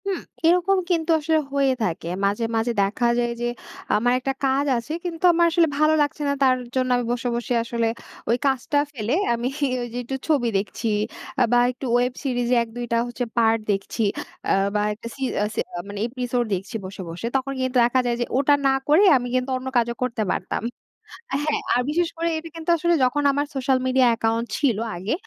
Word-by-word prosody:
হুম, 390 -2 -1 0.3
এরকম 360 +3 +4
কিন্তু 335 -2 +1
আসলে 315 +1 +2
হয়ে 275 -1 +3
থাকে 170 -4 -2 0.2
মাঝে, 205 +3 0
মাঝে 225 +2 +1
দেখা 200 +5 0
যায়, 240 0 0
যে 240 - 0 0.5
আমার 245 +3 +2
একটা 270 +1 -2
কাজ 270 +2 +2
আছে, 235 +6 -6
কিন্তু 335 -1 -5
আমার 340 0 +4
আসলে 330 0 +4
ভালো 305 +1 +4
লাগছে 290 +1 -1
না, 280 - +2
তার 260 -1 +5 0.2
জন্য 255 -1 +1
আমি 245 - -2
বসে, 245 0 -2
বসে 240 +1 -2
আসলে 230 0 -1 0.4
ওই 235 - +3
কাজটা 270 +2 +1
ফেলে, 235 -3 -2 0.2
আমি 235 +1 -1 0.3
ওই 240 - -3
যে - - -4
একটু 265 +3 -4
ছবি 285 -7 +2
দেখছি, 210 +3 -3 0.5
আ - - +7
বা 245 - +5
একটু 255 +2 -8
ওয়েব 250 +1 +2
সিরিজে 245 -2 +1
১-২ 235 +1 -6
টা - - +3
হচ্ছে 240 +1 -4
পার্ট 225 -1 +4
দেখছি, 195 +3 -2 0.5
আ - - +5 0.2
বা 210 - +2
একটা 225 +2 -9
সি 275 - -5 0.2
আ - - +2
সে - - +1 0.2
আ - - -3
মানে 205 0 -6
এপিসোড 245 0 -1
দেখছি 195 +3 -4
বসে, 190 +1 -7
বসে। 170 +7 -6
তখন 270 +1 0
কিন্তু 260 0 -2
দেখা 240 +2 +3
যায় 240 -1 +1
যে - - +1
ওটা 285 +1 +4
না - - +4 0.2
করে, 310 +7 +5
আমি 245 -1 -4
কিন্তু 255 +1 0
অন্য 255 +1 -7
কাজও 235 0 +1
করতে 240 -3 -1
পারতাম 185 - -2 0.8
হ্যাঁ, 305 -1 0
আর 245 - +3
বিশেষ 335 +2 +1
করে 335 +1 -1
এটা 325 +1 -7
কিন্তু 330 0 -6
আসলে 345 +2 +2
যখন 270 +3 +2
আমার 285 +1 0
সোশ্যাল 265 0 +2
মিডিয়া 260 -1 +4
অ্যাকাউন্ট 225 0 0
ছিল 260 -8 +2 0.2
আগে, 185 +6 -2
250 Hz, 205 wpm, -23 LUFS, 235-285 Hz, 0.8 s, আ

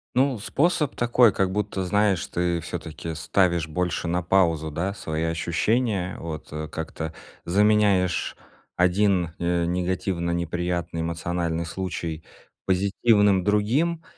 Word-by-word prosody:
Ну, 130 -2 +2
способ 150 - 0
такой, 120 -2 +4
как 95 -1 +1
будто, 105 -1 -2
знаешь, 100 -1 +2
ты 85 -1 -1
всё-таки 80 -1 -6
ставишь 85 -2 +1
больше 90 +2 -2
на 90 +2 0
паузу, 85 -4 +2
да, 90 +6 -2
свои 80 -5 -3
ощущения. 90 +5 0
Вот, 80 -2 -6
э, 75 0 -5
как-то 80 0 -5 0.3
заменяешь 100 -1 +2 0.4
один, 90 -2 +2
э, 85 0 +1
негативно 90 0 -1
неприятный 85 0 -2
эмоциональный 85 0 -2
случай 85 -2 -4 0.4
позитивным 100 +1 +3
другим, 125 - +1
90 Hz, 115 wpm, -25 LUFS, 85-105 Hz, 0.4 s, такой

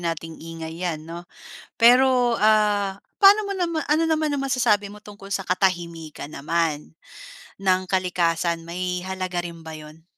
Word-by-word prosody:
nating 165 -1 -4
ingay 165 0 -8
yan, 160 -3 -3
'no? 170 +1 -9 0.5
Pero, 245 0 +5
ah, 210 -2 +2 0.2
pano 400 +2 +8
mo 395 - -2
nama 335 -3 -1
ano 310 +2 +2
naman 310 -2 +1
ang 275 - -2
masasabi 230 -6 +2
mo 210 - -12
tungkol 200 -1 -12
sa 195 - -1
katahimikan 170 -5 -2
naman 155 0 -2 0.7
ng 185 -1 +2
kalikasan 170 -2 0
may 180 +1 -3
halaga 185 -1 -3
rin 170 -1 -8
ba 160 - -8
yun? 155 +1 -13
185 Hz, 145 wpm, -23 LUFS, 165-220 Hz, 0.7 s, pano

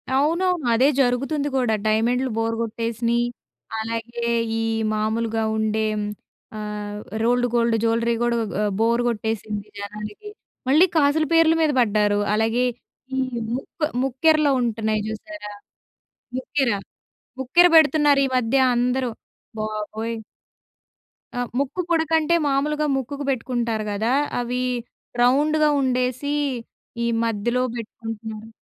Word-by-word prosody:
అవునవును. 335 +2 +1
అదే 255 +4 +4
జరుగుతుంది 275 +4 0
గూడా. 245 -4 +2
డైమెండ్‌లు 240 +4 +2
బోరు 225 0 0
గొట్టేసినియి, 230 +1 -1 0.5
అలాగే 230 +1 -4 0.4
ఈ - - 0 0.3
మామూలుగా 220 +1 0
ఉండేం, 215 0 0 0.6
ఆహ్, 210 -1 -5 0.2
రోల్డ్ 245 +1 +2
గోల్డ్ 235 -1 +3
జూలరీ 230 +1 +2
గూడా 240 0 +1 0.2
ఆహ్, 205 -1 +1
బోరు 235 +1 +2
గొట్టేసింది 215 -2 -3
జనాలకి. 210 - -7 0.4
మళ్ళీ 310 +7 +6
కాసుల 305 +1 +3
పేర్లు 330 0 +5
మీద 310 -2 +3
బడ్డారు. 210 -3 +2 0.2
అలాగే 225 +3 +1 0.5
ఈ - - -1 0.4
ముక్కు 290 +4 -3 0.2
ముక్కెరలో 295 +3 +3
ఉంటన్నాయి 220 -2 0
జూసారా? 220 +1 -7 0.9
ముక్కెర? 265 0 0 0.7
ముక్కెర 345 +8 +5
బెడుతున్నారీ 295 -3 +5
మధ్య 250 +2 +1 0.2
అందరూ 250 +1 +1 0.5
బాబోయ్! 215 +1 -3 1.2
ఆ! 245 - -2 0.2
ముక్కు 285 +6 -1
పుడకంటే, 320 0 +2
మామూలుగా 295 +2 +1
ముక్కుకు 280 +2 -4
బెట్టుకుంటారు 235 -4 -1
గదా! 220 +4 0 0.3
అవి 245 +1 -2 0.6
రౌండుగా 300 +5 +4
ఉండేసీ, 255 +2 0 0.7
ఈ - - +1 0.2
మధ్యలో 230 +3 0
బెట్టుకుంటున్నారు. 225 -1 -7
240 Hz, 105 wpm, -23 LUFS, 220-280 Hz, 1.2 s, మళ్ళీ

